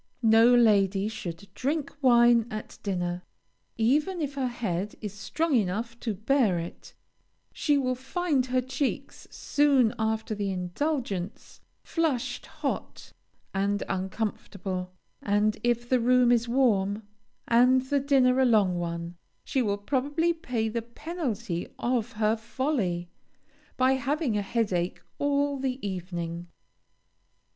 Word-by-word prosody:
No 225 +2 +6
lady 200 -4 +4
should 185 -4 -6
drink 280 +5 -2
wine 240 -3 +5
at 215 0 -7
dinner. 180 -3 -2 0.6
Even 295 +11 +2
if 290 -3 -2
her 270 -2 -1
head 210 -5 -3
is 210 -3 -5
strong 310 +10 -2
enough 225 +3 -1
to 220 -3 -2
bear 220 -2 +2
it, 170 +1 -8 0.6
she 295 -2 +2
will 255 -2 +1
find 265 +1 -1
her 255 0 +1
cheeks, 260 +2 -3
soon 275 -6 +2
after 220 0 -1
the 205 -1 -2
indulgence, 195 - -3 0.2
flushed, 315 -8 -1
hot, - - -5 0.4
and 200 +1 0
uncomfortable; 190 -1 -3 0.3
and 210 +1 +1
if 240 0 +1
the 255 0 +3
room 250 +1 +4
is 240 -1 +3
warm, 215 -5 +2 0.4
and 250 +2 +5
the 280 +2 +1
dinner 265 -2 +3
a 265 - +5
long 200 -7 +3
one, 170 0 -4 0.3
she 265 - 0
will 205 -4 0
probably 285 +9 0
pay 250 -9 -2
the 230 +1 -2
penalty 235 - -4
of 240 -1 -1
her 215 0 +2
folly, 220 - -2 0.7
by 255 +1 +4
having 265 -1 0
a 205 - +1
headache 195 -5 -1 0.2
all 285 0 +1
the 260 -1 -1
evening. 175 -2 -5
230 Hz, 125 wpm, -27 LUFS, 200-265 Hz, 0.7 s, No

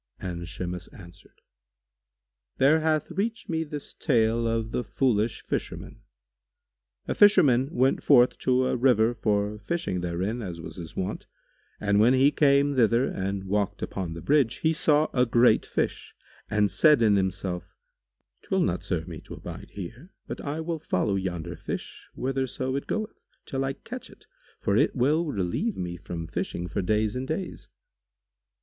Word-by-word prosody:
and 85 -2 -5
Shimas 90 +1 -5
answered, 85 -2 -16 1.2
"There 145 +4 +5
hath 155 +1 0
reached 220 +6 -3
me 160 -1 0
this 150 -2 -7
tale 115 -4 +2
of 115 -1 -1
The 125 - -1
Foolish 110 0 0
Fisherman. - - -5 1.1
A - - 0
fisherman 140 -11 +5
went 130 -3 +2
forth 125 -3 +5
to 130 0 +2
a - - +1
river 120 -2 +3
for 105 -2 0
fishing 105 - -2
therein 90 +7 -2
as 90 -5 -6
was 80 -1 -9
his 85 -3 -8
wont; 95 - -4 0.5
and 100 -1 +2
when 120 +5 +5
he 135 +2 +5
came 140 -1 +3
thither 120 +1 +4
and 95 -2 -3
walked 100 +1 -1
upon 90 -4 -4
the 85 - -8
bridge, 140 -5 +3
he 160 0 +3
saw 155 -1 +3
a 125 - +4
great 120 +1 +4
fish - - -3 0.3
and 105 -2 +2
said 150 -6 +5
in 105 -2 +5
himself, 95 -2 -2 0.7
"'Twill 190 -1 0
not 90 - 0
serve 80 -3 -2
me 80 -3 -8
to - - -10
abide 90 +4 -9
here, 115 - -9
but - - -6
I 150 +2 -3
will 165 0 -3
follow 100 - 0
yonder 90 -3 -3
fish - - -7
whitherso 130 0 -2
it 140 - -3
goeth, 215 0 -3 0.3
till 135 0 -2
I 135 0 -1
catch 250 - -9
it, - - -18 0.3
for - - 0
it - - +3
will 150 +6 +2
relieve 100 - -1
me 90 -1 -4
from 85 -1 -6
fishing 85 +1 -4
for 90 +3 -2
days 105 +3 +1
and 130 +1 -3
days." 175 +5 -5
115 Hz, 160 wpm, -27 LUFS, 95-140 Hz, 1.2 s, There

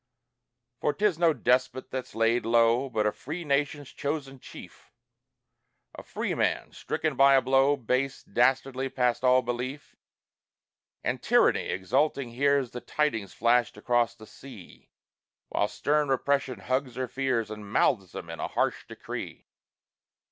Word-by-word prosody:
For 150 - 0
'tis 205 -5 +1
no 170 -2 +5
despot 130 -1 0
that's 130 -4 -5
laid 115 +2 +2
low, 115 +3 +3
But 110 -4 0
a 105 - +2
free 160 +10 -7
nation's 145 -1 -1
chosen 140 -2 -4
chief; - - -13 1.0
A - - -9
free - - -3
man, - - -1
stricken 155 -3 -3
by 135 +1 +6
a 135 - +5
blow 135 +2 +4
Base, 130 +2 -1
dastardly, 130 +3 +1
past 125 -1 0
all 130 0 +5
belief. 125 +4 -5 1.1
And - - -2
Tyranny - - +3
exulting 130 +6 0
hears 140 0 +1
The 125 - -7
tidings 115 -11 -2
flashed 120 -1 +2
across 120 +1 +1
the 110 -2 -13
sea; 115 -6 -14 0.6
While 105 - +1
stern 145 +8 0
Repression 135 -4 0
hugs 130 +3 -2
her 130 0 -2
fears, 125 -4 -1
And 105 -1 -8
mouths 100 -5 +2
them 85 - -7
in 80 - -8
a - - -2
harsh - - -1
decree. - - -7
130 Hz, 140 wpm, -27 LUFS, 115-140 Hz, 1.1 s, by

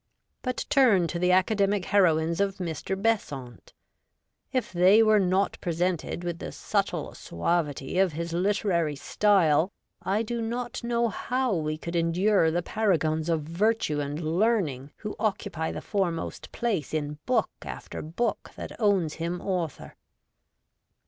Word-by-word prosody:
But 255 -1 -3
turn 230 -11 +5
to 170 - -3
the 180 +1 +3
academic 195 +1 +2
heroines 170 -3 +3
of 195 -1 +1
Mr. 180 +2 -3
Besant. 140 - -2 0.8
If 255 -7 -1
they 185 +5 +6
were 215 -1 +5
not 190 +1 +1
presented 175 0 -1
with 175 -1 -3
the - - -6
subtle - - -2
suavity 145 - -1
of 190 -4 +3
his 170 +2 -4
literary 175 -4 +1
style, 170 +1 +3 0.3
I 205 +4 0
do 235 +1 -3
not 240 +1 -3
know 235 0 +1
how 250 +3 -1
we 155 -3 -1
could 170 +2 -6
endure 170 +2 +3
the 175 +2 -1
paragons 165 -7 0
of 160 -2 +1
virtue 170 -1 0
and 145 +1 -3 0.2
learning 170 - +1
who 210 -1 -6
occupy 195 -6 -1
the - - -5
foremost 180 -5 -2
place 200 - -2
in 150 -1 -3
book 235 -5 +2
after - - -7
book 205 +9 -2
that - - -7
owns 195 -8 +2
him 170 +1 -2
author. 175 -7 -3
180 Hz, 140 wpm, -27 LUFS, 160-210 Hz, 0.8 s, they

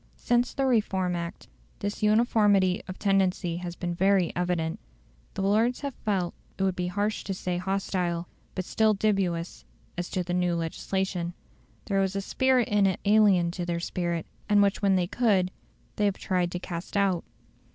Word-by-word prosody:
Since 240 +1 +1
the 270 - +1
Reform 195 -7 +1
Act, 170 0 -6 0.3
this 205 +1 -4
uniformity 210 -4 +3
of 185 - -6
tendency 190 -4 +1
has 175 -1 -5
been 175 -1 -3
very 190 0 +2
evident. 175 0 -1 0.6
The 195 - -2
Lords 225 +6 +2
have 280 -2 -3
felt 190 -7 -1 0.2
it 195 - -1
would 190 -1 +1
be 180 -1 -2
harsh 205 +4 -1
to 195 - -3
say 180 -1 -2
hostile, 180 -2 -1 0.3
but 185 - -3
still 220 +1 +2
dubious, 190 -5 -1 0.4
as 175 - -3
to 185 - -1
the 175 0 -3
new 180 -1 +1
legislation. 175 +1 -2 0.5
There 195 -1 +1
was 190 0 -1
a 195 - 0
spirit 260 +4 +2
in 205 -1 +3
it 190 - -1
alien 200 -5 +4
to 175 0 -4
their 170 -1 -2
spirit, 170 -1 -2 0.2
and 205 -1 +5
which 200 -1 +1
when 195 -2 +3
they 180 -1 +2
could 195 -3 +2 0.5
they 210 - +2
have 200 -2 +1
tried 180 -2 0
to - - -1
cast 175 +3 -5
out. 195 -4 +2
190 Hz, 175 wpm, -27 LUFS, 175-205 Hz, 0.6 s, and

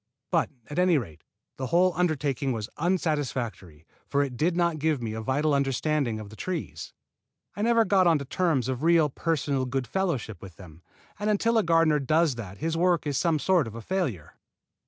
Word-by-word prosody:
But, 170 -4 +2 0.2
at 150 - -3
any 180 -3 +4
rate, 90 - -6 0.3
the 130 - -3
whole 180 +5 +3
undertaking 145 -5 0
was 110 -2 -5
unsatisfactory, 135 - -2 0.2
for 140 0 +1
it 135 -3 -5
did 165 +7 0
not 170 -3 +1
give 155 -1 +1
me 115 -2 -4
a 110 - -4
vital 145 +5 +1
understanding 140 -3 0
of 105 -1 -9
the - - -11
trees. 185 +8 -5 0.6
I 205 - -4
never 230 0 +3
got 190 -3 +4
onto 155 -4 +2
terms 155 -4 0
of 130 -1 -3
real 165 -2 +4
personal 140 -4 -1
goodfellowship 135 - -2
with 95 -4 -11
them; 85 -3 -14 0.4
and 210 +1 -1
until 225 +3 +2
a - - +1
gardener 165 -2 +3
does 155 +2 +2
that 100 -5 -8
his 160 +1 -2
work 175 0 +2
is 145 -3 -1
some 165 -3 +2
sort 170 -3 +2
of 110 - -9
a 115 - -6
failure. 140 - -3
150 Hz, 185 wpm, -27 LUFS, 125-170 Hz, 0.6 s, any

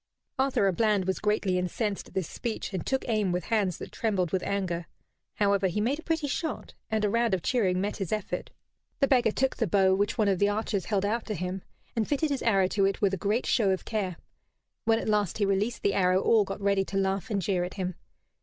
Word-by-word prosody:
Arthur 265 -5 +2
à 190 - +1
Bland 210 -3 +2
was 190 0 -1
greatly 205 -3 +1
incensed 200 +3 -2
at - - -18
this 190 -4 -1
speech, 225 -3 -4
and 185 - -2
took 265 0 -1
aim 215 -5 +1
with 180 0 -1
hands 200 -5 0
that - - -8
trembled 190 -7 0
with 190 - 0
anger. 180 -4 -2 0.5
However, 200 -2 +2
he 185 +3 -2
made 255 +8 0
a - - -9
pretty 325 -3 -1
shot, 320 +3 -3 0.2
and 220 -1 +1
a - - +2
round 230 -3 +2
of 180 - -6
cheering 190 -8 +1
met 205 +2 -2
his 195 -5 -4
effort. 215 -2 -3 0.5
The 275 - +4
beggar 250 -4 +4
took 265 +4 0
the 225 - +1
bow 190 +1 +4
which 205 +4 0
one 215 -3 +3
of 195 -3 +2
the 205 - +4
archers 205 -2 -1
held 200 -2 0
out 220 +3 -1
to 215 - -2
him, 180 +2 -3 0.3
and 225 -2 0
fitted 295 +1 0
his 275 - -1
arrow 195 -5 +3
to 195 -1 +2
it 195 - 0
with 200 -2 +2
a - - +3
great 210 +6 0
show 220 -6 +2
of 190 -1 -1
care. 195 -6 -2 0.7
When 225 0 +4
at - - -4
last 210 -4 +1
he 205 - +2
released 200 +4 0
the 200 - +2
arrow 185 -1 +3
all 215 +1 +4
got 195 +1 -5
ready 200 -1 +2
to 195 - -3
laugh 195 0 0
and 205 -3 0
jeer 185 -1 0
at 180 - -5
him. 185 -2 -2
200 Hz, 240 wpm, -28 LUFS, 190-225 Hz, 0.7 s, The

